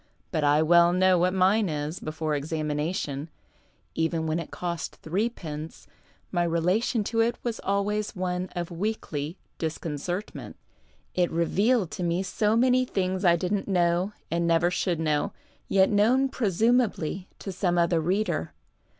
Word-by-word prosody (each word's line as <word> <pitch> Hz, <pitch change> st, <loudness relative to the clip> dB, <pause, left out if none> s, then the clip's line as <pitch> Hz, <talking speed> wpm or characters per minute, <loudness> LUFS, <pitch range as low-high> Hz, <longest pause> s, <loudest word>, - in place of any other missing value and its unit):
But 155 Hz, -3 st, 0 dB
I 145 Hz, +2 st, +4 dB
well 170 Hz, +1 st, +6 dB
know 185 Hz, 0 st, +4 dB
what 180 Hz, +1 st, +3 dB
mine 190 Hz, +2 st, +3 dB
is, 150 Hz, +2 st, -3 dB
before 155 Hz, 0 st, -3 dB
examination. 150 Hz, 0 st, -2 dB, 0.6 s
Even 160 Hz, 0 st, 0 dB
when 160 Hz, +1 st, 0 dB
it 165 Hz, -, -6 dB
cost 170 Hz, -2 st, -4 dB
3rf., 165 Hz, -5 st, -4 dB, 0.5 s
my 175 Hz, -2 st, +1 dB
relation 180 Hz, +7 st, +1 dB
to 225 Hz, +3 st, -2 dB
it 230 Hz, +1 st, +2 dB
was 235 Hz, -2 st, -2 dB
always 200 Hz, +2 st, -1 dB
one 180 Hz, 0 st, -2 dB
of 175 Hz, 0 st, -3 dB
weekly 170 Hz, -4 st, -3 dB, 0.2 s
disconcert 165 Hz, +4 st, -3 dB
ment. -, -, -8 dB, 0.6 s
It 180 Hz, -1 st, +2 dB
revealed 195 Hz, +5 st, +1 dB
to 180 Hz, -, -4 dB
me 175 Hz, +2 st, 0 dB
so 210 Hz, +3 st, +1 dB
many 255 Hz, +2 st, +4 dB
things 190 Hz, -5 st, -1 dB
I 175 Hz, -2 st, +6 dB
didn't 185 Hz, +4 st, -1 dB
know 180 Hz, +1 st, +1 dB, 0.2 s
and 170 Hz, 0 st, +1 dB
never 170 Hz, +1 st, +3 dB
should 175 Hz, -2 st, 0 dB
know, 155 Hz, -2 st, 0 dB, 0.3 s
yet 190 Hz, +1 st, +4 dB
known 245 Hz, +6 st, +3 dB
presumably 215 Hz, -, +1 dB
to 195 Hz, -, -6 dB
some 180 Hz, -1 st, 0 dB
other 170 Hz, -1 st, +3 dB
reader. 190 Hz, +6 st, -1 dB
180 Hz, 145 wpm, -27 LUFS, 165-200 Hz, 0.6 s, well